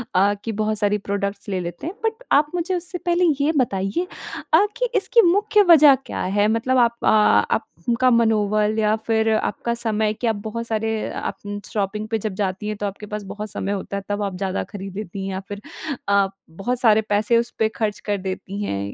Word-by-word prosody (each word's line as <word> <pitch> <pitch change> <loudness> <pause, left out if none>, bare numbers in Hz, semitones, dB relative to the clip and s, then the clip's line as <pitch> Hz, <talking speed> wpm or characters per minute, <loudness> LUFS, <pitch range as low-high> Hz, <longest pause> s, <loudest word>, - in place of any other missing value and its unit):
अ, 200 +2 +4
कि 225 - -3
बहुत 215 0 -1
सारी 205 0 +2
प्रोडक्ट्स 200 0 -4
ले 190 -2 -1
लेते 175 - -5
हैं। 360 - -5
बट 450 +2 -2
आप 295 +1 +4
मुझे 355 +2 -1
उससे 355 +1 -4
पहले 350 0 +1 0.2
ये 295 +3 +3
बताइए 195 - 0 0.5
अ, - - +7
कि - - 0
इसकी 470 - +4
मुख्य 415 +3 +4
वजह 300 -4 +8
क्या - - -4 0.2
है? 205 +1 +4
मतलब 230 +4 +1
आप 235 -1 +3
अ, - - +2
आपका 235 +3 +2
मनोबल 215 -2 +2
या 215 0 +3
फिर 225 -1 +2
आपका 235 +2 -1
समय, 220 -2 0
क्या 225 +1 0
आप - - -4
बहुत 230 +2 -4
सारे 220 0 -1
आप - - -4
उम, 205 0 -4
शॉपिंग 210 +1 -2
पे 225 - 0
जब 210 - -4
जाती 190 +2 -3
हैं, 215 -1 -3
तो 205 - -3
आपके 200 +1 -5
पास 210 - -5
बहुत 210 0 -5
समय 195 - -3
होता 200 0 -3
है, 200 - -5
तब 205 0 -1
आप 195 -2 -3
ज़्यादा 190 0 -2
खरीद 195 -1 -7
लेती 195 -2 -5
हैं, 195 - -3
या 190 - -3
फिर 205 0 -6 0.5
अ, 200 -1 +4 0.2
बहुत 195 +9 -3
सारे 220 -2 +5
पैसे 210 +3 +3
उस 235 +1 -1
पे 220 - +3
खर्च 210 -1 0
कर 205 - +1
देती 190 +1 -5
हैं, 100 - -3
215 Hz, 210 wpm, -22 LUFS, 200-235 Hz, 0.5 s, वजह